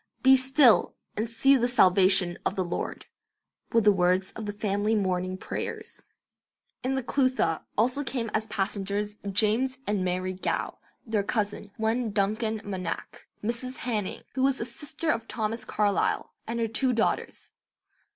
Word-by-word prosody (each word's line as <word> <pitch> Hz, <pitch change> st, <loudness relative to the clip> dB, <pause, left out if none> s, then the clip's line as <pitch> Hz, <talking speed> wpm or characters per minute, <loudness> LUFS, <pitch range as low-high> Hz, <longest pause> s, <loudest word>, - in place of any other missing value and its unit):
"Be 265 Hz, 0 st, +8 dB
still, 260 Hz, -1 st, +4 dB, 0.2 s
and 220 Hz, +2 st, -2 dB
see 270 Hz, +4 st, +4 dB
the 245 Hz, -2 st, +2 dB
salvation 185 Hz, -5 st, +4 dB
of -, -, -1 dB
the 185 Hz, -, -1 dB
Lord," 175 Hz, -, -4 dB, 0.7 s
were 230 Hz, -, +4 dB
the 210 Hz, -1 st, +6 dB
words 185 Hz, 0 st, +2 dB
of 220 Hz, -2 st, -7 dB
the -, -, -1 dB
family 205 Hz, +1 st, 0 dB
morning 185 Hz, -2 st, -1 dB
prayers. -, -, -6 dB, 0.8 s
In 265 Hz, +1 st, 0 dB
the 265 Hz, -, -1 dB
'Clutha' 255 Hz, -, +1 dB
also 250 Hz, +6 st, +2 dB
came 240 Hz, -5 st, -3 dB
as 215 Hz, 0 st, 0 dB
passengers 205 Hz, +1 st, -2 dB
James 225 Hz, +6 st, +2 dB
and 205 Hz, -2 st, 0 dB
Mary 185 Hz, +1 st, -1 dB
Gow; 185 Hz, -, -3 dB, 0.3 s
their 220 Hz, -3 st, 0 dB
cousin, 205 Hz, 0 st, -2 dB
one 225 Hz, +2 st, 0 dB
Duncan 215 Hz, +2 st, 0 dB
Monach; 185 Hz, -4 st, -5 dB, 0.2 s
Mrs. 240 Hz, +4 st, -3 dB
Hanning, 215 Hz, -6 st, -2 dB
who 260 Hz, -, -2 dB
was 270 Hz, 0 st, +2 dB
a -, -, -2 dB
sister 305 Hz, +5 st, -3 dB
of 230 Hz, -3 st, -3 dB
Thomas 220 Hz, +1 st, -3 dB
Carlyle; 205 Hz, -1 st, 0 dB
and 235 Hz, +1 st, -2 dB
her 230 Hz, -, +1 dB
two 250 Hz, +4 st, +1 dB
daughters. 230 Hz, -1 st, -1 dB
215 Hz, 150 wpm, -27 LUFS, 195-245 Hz, 0.8 s, Be